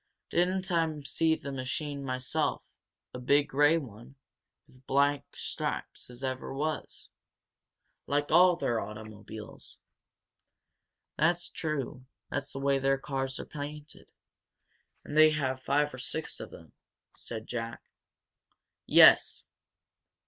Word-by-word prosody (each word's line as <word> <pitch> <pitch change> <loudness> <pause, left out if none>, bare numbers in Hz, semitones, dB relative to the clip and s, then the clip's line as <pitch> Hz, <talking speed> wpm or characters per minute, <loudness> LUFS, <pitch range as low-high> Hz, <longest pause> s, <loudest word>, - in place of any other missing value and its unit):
"Didn't 185 +1 +1
I 165 -3 +1
see 160 +3 +1
the 140 - -7
machine 140 +2 -3
myself 130 -1 -1 0.5
a 125 - -6
big 140 +3 +3
grey 145 +4 +4
one, 125 -2 -9 0.5
with 130 0 -22
black 140 +1 +2
stripes - - -4
as 125 +2 -10
ever 130 -1 -3
was, 155 +2 -4 1.0
like 145 +1 0
all 175 +2 +7
their 120 -9 0
automobiles?" 110 0 -9 1.4
"That's 170 +3 +2
true 140 -5 -4 0.3
that's 140 0 -3
the - - -7
way 135 0 +2
their 135 0 +2
cars 135 -1 -3
are - - -5
painted, 150 0 -8 1.0
and 150 - -7
they 155 0 +8
have 130 -4 -1
five 145 +2 +1
or 130 - -8
six 125 - -4
of - - -7
them," - - -14 0.4
said 110 -1 -6
Jack. 115 -1 -5 1.0
"Yes. - - +7
140 Hz, 120 wpm, -30 LUFS, 130-150 Hz, 1.4 s, they